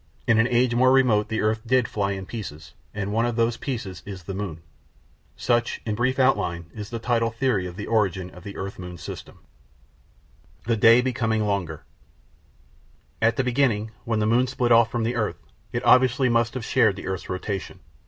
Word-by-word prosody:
In 115 - +4
an 115 - +4
age 120 0 +2
more 130 +2 +4
remote 120 -6 +3
the 110 0 -2
earth 110 +1 0
did 125 0 +2
fly 100 -1 -1
in 95 0 -6
pieces, 80 -9 -8 0.2
and 100 0 -4
one 115 +2 +2
of 120 - -2
those 115 0 +1
pieces 115 - -5
is 95 -3 -8
the 95 - -6
moon. 90 -5 -5 0.7
Such, 120 -1 0
in 110 - -1
brief 125 +4 0
outline, 85 -11 +1
is 105 -1 -7
the 115 - -4
tidal 115 0 0
theory 115 -5 0
of 90 - -9
the 105 - -6
origin 95 -5 0
of 90 - -13
the 100 - -8
earth 100 0 -6
moon 90 -1 -7
system. - - -9 1.3
The 115 0 +1
Day 115 +3 +6
Becoming 115 -4 0
Longer 90 -7 -2 1.4
At 115 0 +3
the 135 - +1
beginning, 120 -4 +1
when 115 -2 -1
the 105 - +1
moon 120 +4 +3
split 125 -1 -1
off 115 -1 +6
from 120 -1 -2
the 120 +2 -1
earth, 110 -3 -1 0.3
it - - -3
obviously 130 0 +4
must 115 +1 +1
have 125 -3 -4
shared 105 -4 +3
the 95 - -8
earth's 95 -1 -4
rotation. 95 +1 -4
110 Hz, 195 wpm, -24 LUFS, 100-120 Hz, 1.4 s, Day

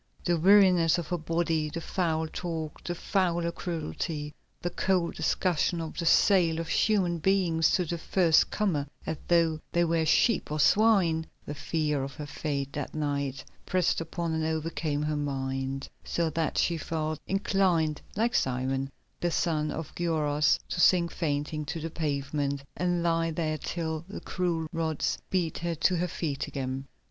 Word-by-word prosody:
The 175 - +3
weariness 180 -3 +6
of 170 -3 -4
her 175 - 0
body, 165 -1 0
the 165 - -4
foul 160 -2 -1
talk, 160 -2 -5
the 175 - -3
fouler 175 -2 0
cruelty, 155 - -4 0.3
the 175 - -3
cold 180 -2 +1
discussion 175 -1 0
of 160 -1 -5
the 170 - -1
sale 170 -3 +5
of 165 - -4
human 185 -6 +2
beings 170 -3 +2
to 180 - +2
the 170 +1 -3
first 165 -1 +3
comer 165 -9 0 0.2
as 160 - -2
though 165 -2 +3
they 175 0 +3
were 165 -1 +1
sheep 215 +1 +3
or 155 - -1
swine, 175 -2 +4 0.2
the - - -4
fear 150 -2 -1
of 135 0 -6
her 150 - -6
fate 140 -1 -3
that 145 0 -5
night, 140 -3 -2 0.2
pressed 180 -2 +1
upon 165 0 -3
and 160 0 0
overcame 160 -2 -1
her 150 0 -1
mind, 135 -1 -2 0.2
so 165 -2 -1
that 160 0 -1
she 170 - +2
felt 155 0 -3
inclined, 190 -6 +1
like 230 +4 +1
Simon, 130 - 0 0.3
the 175 - 0
son 155 -2 0
of 160 -1 -5
Gioras, 150 -4 +2
to 175 - -1
sink 175 -2 +5
fainting 150 -1 -2
to 150 +3 -4
the 165 +1 -5
pavement 140 -2 -2
and 175 -1 0
lie 165 -1 +2
there 155 -1 -2
till 160 -1 -3
the 205 - -6
cruel 175 -3 -1
rods 160 -2 -1
beat 175 -4 0
her 170 0 -2
to 175 +3 +2
her 180 +2 0
feet 155 -4 -3
again. 135 0 -4
160 Hz, 165 wpm, -28 LUFS, 150-175 Hz, 0.3 s, weariness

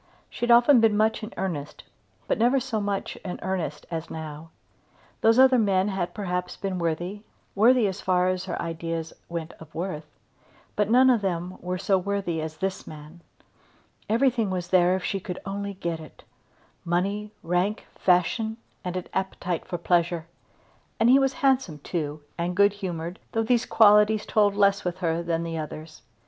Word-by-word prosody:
She 240 - -2
had - - +3
often 240 +3 +7
been 220 -2 +3
much 220 +1 +2
in 215 +1 -6
earnest 165 -7 -4 0.4
but - - 0
never 245 +4 +4
so 245 -5 -2
much 200 -1 -3
in 180 - -6
earnest 180 -6 -3
as 165 0 -4
now. 155 0 -7 0.7
Those 225 +1 +5
other 260 -1 +6
men 195 -2 +2
had 180 -3 -3
perhaps 180 -3 -3
been 190 -2 -3
worthy, 175 +4 -2 0.3
worthy 235 +3 +5
as 195 0 -4
far 180 -1 +2
as 185 0 -1
her 185 - -4
ideas 165 -1 -4 0.2
went 170 -1 -5
of 160 -2 -14
worth, 165 -3 -4 0.7
but 210 0 +1
none 255 +3 +6
of 235 -4 +2
them 180 -1 -2 0.2
so 195 +1 +2
worthy 190 -4 -2
as 155 0 -6
this 190 +3 -3
man. 155 +3 -11 0.9
Everything 230 -2 +2
was 180 -2 -3
there 180 0 +4
if 190 - -4
she 195 - -1
could 180 -1 -6
only 200 0 -4
get 170 -3 -3
it; 155 -2 -13 0.6
money, 200 +5 -1
rank, 180 +5 0
fashion, 220 +5 +1 0.3
and 180 0 -3
an 180 - -4
appetite 180 -2 -3
for 175 - -3
pleasure. 170 -1 +1 0.7
And 230 +2 +5
he 270 - +7
was 270 -1 +2
handsome 260 - +2
too, 150 -1 -4 0.2
and 175 +1 -1
good 200 0 +5
humoured, 175 -3 -5
though 225 - +1
these 240 +1 +1
qualities 210 0 +5
told 205 -2 +2
less 200 -1 +3
with 180 0 -3
her 170 -2 -1
than 170 -1 -1
the 165 -1 -4
others. 155 -1 -8
185 Hz, 170 wpm, -26 LUFS, 170-210 Hz, 0.9 s, often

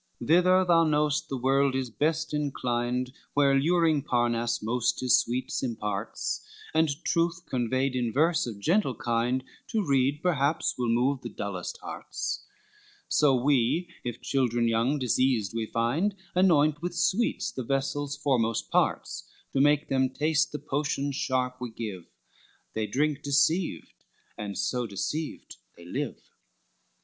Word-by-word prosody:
III - - -7
Thither 180 +3 +5
thou 170 -2 +5
know'st 150 -1 +1
the 135 - -2
world 135 +1 +2
is 130 -3 -2
best 155 +4 -1
inclined 125 -3 -1 0.2
Where 140 -1 +4
luring 160 +1 +3
Parnass 120 -4 0
most 115 +2 0
his 130 -1 +4
sweet 125 +3 -2
imparts, 105 - -3 0.3
And 160 0 +3 0.2
truth 170 0 0
conveyed 130 +2 0
in 120 -2 0
verse 160 +3 +2
of 110 -4 -6
gentle 160 - +1
kind 120 +3 0 0.2
To 215 -3 -1
read 140 +1 +1
perhaps 155 -3 +1
will 120 -2 -1
move 125 +4 +1
the 120 - -6
dullest 100 -4 -5
hearts: - - -4 0.7
So 145 -3 +4
we, 135 +6 +2
if 120 -1 -5
children 120 -3 +1
young 115 +6 +1
diseased 125 -5 +1
we 115 -1 -2
find, 140 - 0 0.2
Anoint 155 -5 +3
with 175 0 -3
sweets 190 +7 +1
the 130 - -5
vessel's 140 +3 -2
foremost 125 -6 0
parts - - 0 0.2
To 135 - +3
make 145 +1 +3
them 130 -1 +2
taste 150 +3 +1
the 150 - -3
potions 145 -1 -2
sharp 125 -1 -1
we 125 - -3
give; 105 -6 -6 0.7
They 110 -1 -1
drink 145 +6 0
deceived, 145 - +1 0.4
and 100 -1 -5
so 125 -2 -1
deceived, 150 +10 -4 0.2
they 85 - -13
live. 90 - -3
135 Hz, 140 wpm, -28 LUFS, 120-150 Hz, 0.7 s, Thither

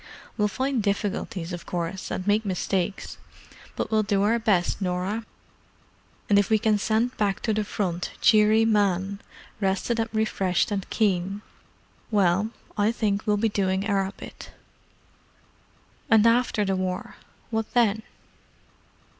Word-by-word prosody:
"We'll 210 -2 +2
find 260 +4 -1
difficulties, 200 -3 -2
of 175 - -7
course, 175 +1 -3
and 185 - -3
make 210 +2 +2
mistakes, 190 0 -2 0.6
but - - -3
we'll 215 0 +3
do 200 -1 +1
our 230 +3 +2
best, 200 -4 +1
Norah. 190 +5 -2 1.0
And 200 -1 +5
if 205 - +1
we 220 - +4
can 215 -1 +2
send 225 +4 0
back 200 -2 0
to 220 - 0
the 215 0 0
Front 180 -4 -2
cheery 215 +1 +5
men, 200 -2 +1 0.4
rested 200 +4 0
and 225 0 0
refreshed 205 -4 0
and 195 -2 -3
keen—well, 200 0 -1 0.3
I 210 +1 +2
think 210 -3 -1
we'll 210 0 +3
be 225 +2 +2
doing 190 -1 0
our 195 -2 0
bit. - - -10 1.6
And 225 -1 +5
after 230 -2 +3
the 195 -1 0
War? 185 -1 -3 0.3
What 220 -1 -2
then?" 220 -3 +3
205 Hz, 135 wpm, -25 LUFS, 190-220 Hz, 1.6 s, And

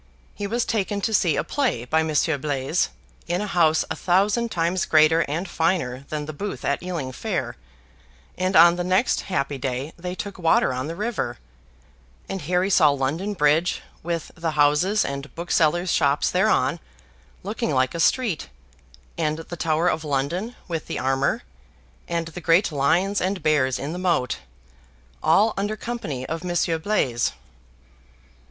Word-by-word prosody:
He 205 - -4
was 235 +3 0
taken 205 -1 -1
to 220 - -1
see 175 -7 +3
a - - 0
play 255 - -1
by 160 +5 +2
Monsieur 155 -1 +1
Blaise, 140 +3 0 0.4
in 175 +1 0
a 210 - -2
house 170 -5 +3
a - - -1
thousand 200 +6 +2
times 175 -1 0
greater 155 +1 +5
and 165 +7 -3
finer 160 -7 -1
than 150 -1 -3
the 155 - -6
booth 200 +7 -5
at 140 - 0
Ealing 170 -8 -4
Fair 130 - -3 0.8
and 185 +1 -1
on 170 +2 +7
the 175 - -1
next 185 +6 +2
happy 140 -7 -2
day 130 +3 -3
they 180 +1 -5
took 200 0 -6
water 165 -5 +3
on 130 +3 -3
the 165 - -5
river, 210 - -3 0.9
and 195 -1 -4
Harry 180 +5 0
saw 155 -5 +6
London 145 +9 -1
Bridge, 155 +2 +2 0.2
with 170 -1 -3
the 165 -1 -3
houses 150 +8 +3
and 140 +1 -6
booksellers' 170 +1 +1
shops 140 +1 +2
thereon, - - +2 0.6
looking 215 +3 -2
like 130 -2 +1
a 170 - -4
street, 190 - +1 0.7
and 155 -1 0
the 165 +1 -7
Tower 160 +1 +1
of 160 -2 0
London, 155 - -2
with 165 -3 -4
the - - -3
Armor, 135 - 0 0.6
and 170 -1 -2
the 175 +2 -8
great 170 +3 +3
lions 170 +8 +1
and 185 -2 -1
bears 140 -5 +2
in 145 +4 -4
the 180 - -5
moat 170 -9 0 0.8
all 200 +8 +4
under 205 +2 -2
company 155 - -4
of 165 +3 -4
Monsieur 175 -2 0
Blaise. 150 - 0
165 Hz, 160 wpm, -24 LUFS, 145-185 Hz, 0.9 s, on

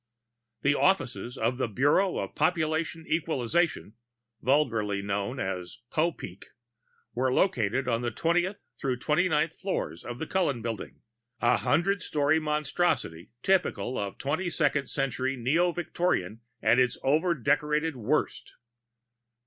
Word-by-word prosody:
I 120 +1 -7
The - - +5
offices 130 -9 +1
of 120 +3 0
the 130 - +1
Bureau 145 - +2
of 95 - -4
Population 160 0 0
Equalization, 160 -4 0 0.5
vulgarly 115 -8 +1
known 100 +6 -2
as 90 -4 -4
Popeek, 155 - -2 0.7
were 130 +1 +1
located 130 - +1
on 115 -1 +1
the 120 - -1
twentieth 175 - 0 0.2
through 130 -2 -2
twenty 155 +8 +1
ninth 155 0 +1
floors 185 - -3
of 120 0 -6
the 160 - -4
Cullen 150 - 0
Building, 115 -2 -5 0.4
a 120 0 +3
hundred 170 - +1
story 150 -1 +2
monstrosity 150 - -1
typical 180 - +1
of 100 -4 -3
twenty 160 +7 -1
second 145 -4 +1
century 135 -1 -1
neo 160 +9 +2
Victorian 165 - -1 0.2
at 120 - +5
its 125 -1 +2
overdecorated 150 0 +1
worst. 115 -4 -1
135 Hz, 125 wpm, -28 LUFS, 115-160 Hz, 0.7 s, The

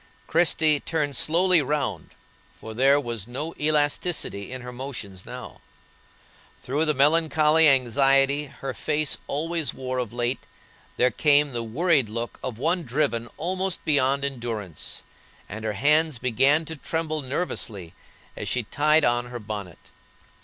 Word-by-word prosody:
Christie 160 -3 +3
turned 145 -3 -2
slowly 175 +1 +3
round, 145 0 -3 0.4
for 110 - -8
there 135 +5 +4
was 120 -6 -5
no 145 +7 -5
elasticity 150 - 0
in 130 -1 -6
her 125 - -7
motions 115 -8 -7
now; - - -9 1.0
through 145 +5 0
the 150 - +1
melancholy 155 +2 +4
anxiety 135 +2 +3
her 135 -1 -7
face 150 +4 -1
always 160 -1 -1
wore 130 -1 -3
of 120 -4 -3
late, 120 +1 -1 0.6
there 125 0 +3
came 145 +3 +3
the 120 - -1
worried 135 +2 +1
look 115 +2 -5
of 120 -4 -4
one 165 +8 0
driven 125 -4 -1
almost 185 +3 -2
beyond 140 -2 +2
endurance, 115 - -5 0.4
and 110 +2 -7
her 110 -1 -1
hands 150 +6 +2
began 135 +6 +2
to 160 - -6
tremble 155 +1 -2
nervously 115 - -4 0.4
as - - -5
she 125 - 0
tied 150 +7 +3
on 120 0 +1
her 120 0 -6
bonnet. 105 -5 -7
140 Hz, 140 wpm, -25 LUFS, 120-155 Hz, 1.0 s, there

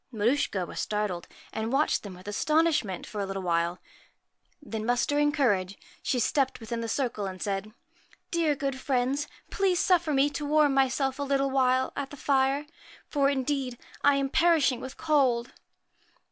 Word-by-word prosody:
Maruschka 215 -4 0
was - - -7
startled, 210 -5 -2 0.3
and 220 +1 -2
watched 280 +3 +2
them 200 -3 -9
with 185 +2 -14
astonishment 300 - +1
for 210 - -5
a - - -1
little 195 0 -4
while; 170 0 0 0.8
then 225 -8 -5
muster 245 +5 +1
ing 295 0 +3
courage, 200 -10 +1 0.2
she 255 - 0
stepped 265 +3 +1
within 230 0 -4
the 230 - -3
circle 235 -7 -1
and 185 -1 -7
said: 200 +2 -3 0.3
' - - -31
Dear, 330 -3 +2
good 275 -1 -3
friends, 265 +2 0 0.2
please 385 -3 +2
suffer 345 -4 +3
me 275 0 +4
to 295 - -4
warm 295 -1 +3
myself 270 0 +1
a - - -2
little 275 -1 +1
while 260 -1 +2
at 280 -1 -3
the 290 - -10
fire, 275 +1 +1 0.4
for, 280 -2 +2
indeed, 265 -2 -1 0.3
I 285 0 +5
am 275 -1 0
perishing 295 -6 +3
with 260 - -8
cold.' 265 -7 +2
265 Hz, 170 wpm, -28 LUFS, 220-285 Hz, 0.8 s, I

